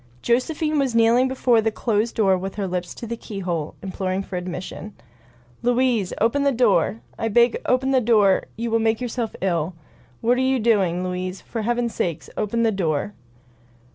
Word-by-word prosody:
Josephine 300 +5 +1
was 265 -4 0
kneeling 230 +3 +4
before 255 -3 +2
the 220 - +1
closed 220 0 -1
door 195 -4 +3
with 190 +1 -5
her 200 -2 -2
lips 180 -1 -4
to - - -7
the 235 +1 -4
keyhole, 180 -8 -4
imploring 190 0 -2
for 190 - -7
admission. 180 +3 -6 0.7
"Louise, 245 -5 +1
open 230 +6 +2
the 280 0 +3
door! 225 -4 +2 0.2
I 225 - 0
beg, 235 +2 +3
open 260 +1 +2
the 260 -1 +4
door 215 -4 +3
— - - -32
you 230 0 -3
will 230 - +3
make 220 0 +1
yourself 240 -2 -3
ill. 175 -2 -1 0.4
What 245 +2 +2
are - - +2
you 260 0 +2
doing, 195 -6 +2
Louise? 185 +1 -4
For 230 - -5
heaven's 240 +1 -1
sake 165 -4 -2
open 230 +3 0
the 225 - +3
door." 180 -1 -1
225 Hz, 180 wpm, -23 LUFS, 190-240 Hz, 0.7 s, kneeling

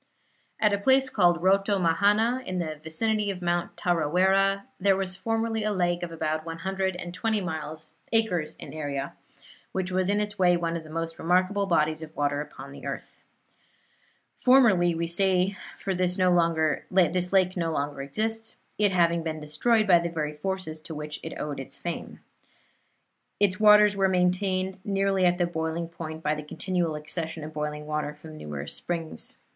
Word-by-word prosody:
At 210 -1 +3
a 200 - +1
place 265 +4 +4
called 175 -6 +3
Rotomahana, 200 +5 +3
in 185 - -2
the 155 -4 -3
vicinity 210 +6 0
of 190 -2 -3
Mount 175 0 -1
Tarawera, 190 +4 +2 0.2
there 195 0 +4
was 190 -1 -2
formerly 225 +3 -1
a 215 - 0
lake 175 -3 0
of 175 -1 -4
about 155 -1 -2
one 165 0 -6
hundred 190 +1 -2
and 175 -1 -6
twenty 220 +5 0 0.7
acres 195 -9 +1
in - - -9
area, 140 -3 -4 0.6
which 185 -1 -2
was 185 0 +1
in 205 +1 +2
its 210 -1 -3
way 175 -1 +5
one 170 -1 -2
of 165 - -4
the 155 - -13
most 165 +1 -4
remarkable 185 +4 +2
bodies 155 -3 +1
of 160 0 -9
water 145 0 0
upon 140 -2 -9
the 140 - -11
earth. - - -6 1.2
Formerly, 215 -10 +5
we 170 +1 -1
say, 185 +2 +2 0.2
for 195 - -2
this 180 0 +1
lake 180 +1 +2
no 170 -2 -1
longer 145 -2 -2
exists, 220 +10 -3 0.2
it 205 -2 +4
having 170 -2 +3
been 160 -1 -4
destroyed 215 +10 +1
by 180 -4 +6
the 170 0 -2
very 155 -2 -3
forces 160 0 -4
to 160 +1 -8
which 150 0 -5
it - - -7
owed 145 -2 -4
its 135 - -7
fame. 175 -1 -6 1.2
Its 205 -1 +2
waters 210 -1 +7
were 195 -1 +2
maintained 185 +1 +1
nearly 195 -2 +2
at 175 0 +2
the 175 - +2
boiling 165 0 -3
point 160 -1 -7
by 150 - +1
the 150 - -4
continual 170 +1 -2
accession 160 +1 -5
of 155 +1 -7
boiling 150 0 -4
water 150 -1 -3
from 155 +1 -12
numerous 75 - -6
springs. 165 -2 -4
175 Hz, 170 wpm, -27 LUFS, 160-195 Hz, 1.2 s, waters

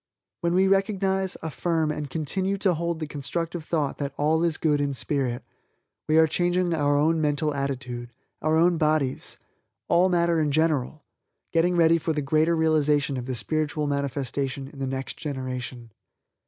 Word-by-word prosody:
When 170 -1 0
we 190 +1 +4
recognize, 195 -1 +1
affirm, 160 +1 0
and 150 -1 -4
continue 185 +7 -1
to 195 -2 +2
hold 170 +1 -2
the 160 - -4
constructive 165 +3 -4
thought 155 -3 -1
that 140 -1 -3
All 160 +3 +2
is 165 -2 +1
Good 150 -2 +1
in 140 -1 -1
spirit, 130 -1 -1 0.7
we 155 - +4
are 160 - +7
changing 175 +2 +1
our 145 -2 +2
own 160 +2 +2
mental 150 0 0
attitude, 130 -3 -4 0.3
our 155 +1 +2
own 170 0 +3
bodies, 150 -4 +1 0.5
all 175 +2 +4
matter 170 -2 +2
in 150 -1 +1
general 155 -1 0 0.5
getting 175 +2 +3
ready 165 -1 +4
for 160 0 -1
the 150 - -1
greater 155 +4 +2
realization 150 -3 +2
of 125 -1 -5
the 130 - -2
spiritual 150 +6 -1
manifestation 140 -1 -2
in 140 - -13
the 135 - -2
next 135 0 -4
generation. 130 -4 -5
155 Hz, 165 wpm, -25 LUFS, 140-170 Hz, 0.7 s, are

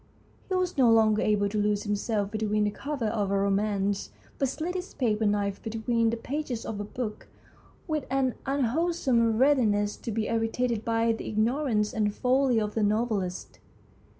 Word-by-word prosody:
He 375 - 0
was 365 -5 -1
no 250 -3 +6
longer 220 -1 +4
able 205 -1 +2
to 210 +1 -1
lose 205 0 +1
himself 205 0 -1
between 215 -1 0
the 210 - +1
covers 270 -2 -3
of 205 -3 -1
a 200 - +1
romance, 200 0 0 0.3
but 275 - +2
slid 320 +6 -3
his 370 +1 -6
paper 220 -4 +1
knife 200 -1 0
between 230 +1 0
the 230 - -1
pages 260 -1 -4
of 210 - -4
a - - -2
book 215 +1 -5 0.6
with 310 -4 -2
an 265 -2 +1
unwholesome 270 -3 +1
readi 265 -2 +4
ness 205 0 0
to 230 - -5
be 220 0 -1
irritated 225 0 0
by 230 0 +1
the 225 - -4
ignorance 220 -1 0
and 210 -2 0
folly 255 -1 +2
of 210 -1 -2
the 225 - -1
novelist. 210 -3 -1
225 Hz, 175 wpm, -27 LUFS, 210-255 Hz, 0.6 s, no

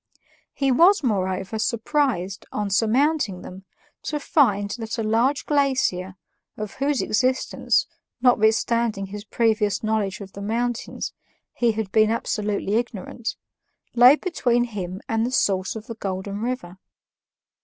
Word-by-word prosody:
He 275 -1 +1
was, 345 +7 +5
moreover, 190 -2 -1
surprised, 230 - -1
on 205 -1 -2
surmounting 225 - +1
them, 190 +1 -10 0.4
to 300 - -3
find 205 -9 +2
that 225 +2 -4
a 225 - -1
large 235 +6 +1
glacier, 260 -11 +1 0.4
of 215 -1 -5
whose 275 0 0
existence, 255 +5 +1 0.3
notwithstanding 230 -3 +2
his 205 +1 -8
previous 215 -2 +1
knowledge 215 -2 -1
of 195 -2 -9
the 200 - -8
mountains, 235 +3 -2 0.4
he 235 -2 +1
had 215 -3 -4
been 215 0 +4
absolutely 210 -2 -1
ignorant, 235 0 -4 0.6
lay 245 +3 +8
between 245 -9 0
him 195 -5 -5
and 225 0 0
the 240 - 0
source 195 -7 +1
of 220 0 -7
the 230 - -6
Golden 195 -1 -4
River. 230 -7 -4
220 Hz, 130 wpm, -23 LUFS, 200-245 Hz, 0.6 s, lay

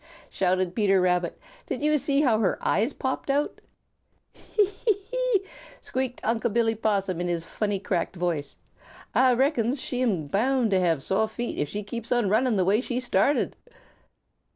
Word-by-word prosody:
shouted 185 -1 0
Peter 195 -3 +3
Rabbit. 180 -1 +1 0.3
"Did - - -4
you 300 0 +3
see 280 +1 +1
how 235 -7 +3
her 210 - +1
eyes 225 +7 +1
popped 260 0 -3
out?" 285 +2 0 0.7
"Hee, 420 - 0
hee, 405 +1 -1
hee!" - - +1 0.4
squeaked 260 -1 -3
Unc' 230 0 0
Billy 225 0 +2
Possum 200 -5 -1
in 175 - -1
his 170 -1 -1
funny 205 +1 -2
cracked 185 -1 -2
voice. 170 -5 -2 0.6
"Ah 255 -1 +4
reckons 265 -1 +1
she 250 -1 -3
am 195 -11 +1
bound 235 - +1
to 190 - +3
have 165 -6 +1
sore 205 +3 +1
feet 240 +2 -5
if 145 - -1
she 210 +1 -4
keeps 235 +4 -6
on 240 -5 +2
running 230 +3 +2
the 185 -2 +2
way 205 +5 +3
she 250 -1 -2
started." 250 +2 +1
225 Hz, 170 wpm, -26 LUFS, 190-260 Hz, 0.7 s, Ah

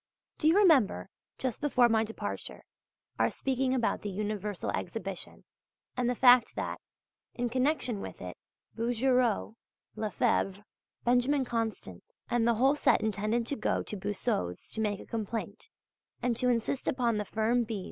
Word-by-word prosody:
Do 305 - +2
you 330 +5 +5
remember, 275 - +4 0.3
just 255 +1 -3
before 260 -5 +4
my 225 -1 +3
departure, 225 0 -6 0.6
our - - +4
speaking 265 0 0
about 240 -3 0
the 205 - -4
Universal 205 0 -3
Exhibition 190 -1 -4 0.5
and 245 -1 0
the 250 - 0
fact 245 -1 +6
that, - - -4 0.5
in 245 0 -1
connection 255 -3 0
with - - -8
it, - - -7 0.4
Bouguereau, 240 -1 +1 0.4
Lefèbvre, 210 -2 0 0.4
Benjamin 250 +3 +3
Constant 225 - -3 0.3
and 235 -1 +2
the 235 - +4
whole 265 +5 +4
set 295 - +3
intended 220 +4 -1
going - - 0
to - - -5
Boussod's 180 - -3
to 220 - -3
make 205 -2 0
a - - -10
complaint 220 - -5 0.5
and 245 -1 0
to 250 +2 +1
insist 240 +2 0
upon 240 -4 +1
the 210 - -2
firm 225 +4 +1
B. 220 -2 -4
230 Hz, 145 wpm, -30 LUFS, 210-250 Hz, 0.6 s, fact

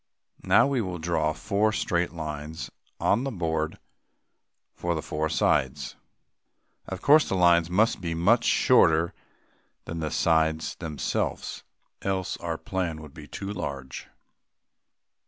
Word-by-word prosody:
Now - - +5
we 135 -3 +1
will 90 -4 -4
draw 80 -2 0
four 105 +5 0
straight 90 -5 0
lines 75 -1 -6 0.3
on 115 +5 +2
the 135 - -1
board 80 - -2 1.0
for 85 -1 -2
the 80 - -2
four 80 +1 -2
sides. 65 -3 +1 0.9
Of - - -6
course, 150 +1 +6
the - - 0
lines 85 -2 +4
must 110 +4 +2
be 85 -2 -2
much 100 +9 +3
shorter 80 +1 +4 0.7
than 85 - -5
the 80 -1 -2
sides 80 0 +1
themselves, 80 -4 -3 0.4
else 95 -2 -1
our 85 -1 -3
plan 90 -4 -3
will 75 -1 -10
be 75 +1 -12
too 95 +8 -6
large. 70 -8 -6
85 Hz, 130 wpm, -27 LUFS, 80-95 Hz, 1.0 s, course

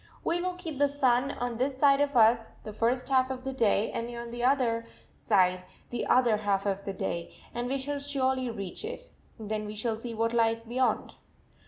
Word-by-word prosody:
"We 345 +1 0
will 365 0 -2
keep 325 -6 -6
the 285 0 +4
sun 265 -2 +2
on 245 -1 -3
this 260 +2 -1
side 275 0 +5
of 285 -1 0
us 225 0 +4
the 215 - -7
first 245 +4 0
half 260 -1 +3
of 255 -1 -5
the 265 0 -3
day 220 -4 +2
and 230 +1 -3
on 235 0 -6
the 240 0 -4
other 240 -3 +2 0.3
side 185 -3 +2 0.3
the 240 - -2
other 240 -4 +4
half 200 -2 0
of 200 0 -1
the 195 - -3
day 170 -2 -3 0.2
and 240 +1 -2
we 270 +2 0
shall 285 +2 -3
surely 265 -3 0
reach 200 - -5
it. - - -6 0.3
Then 215 -1 -4
we 210 - -6
shall 220 +1 -2
see 230 0 -6
what 230 +1 0
lies 230 -1 +2
beyond." 250 +3 0
240 Hz, 205 wpm, -29 LUFS, 220-265 Hz, 0.3 s, side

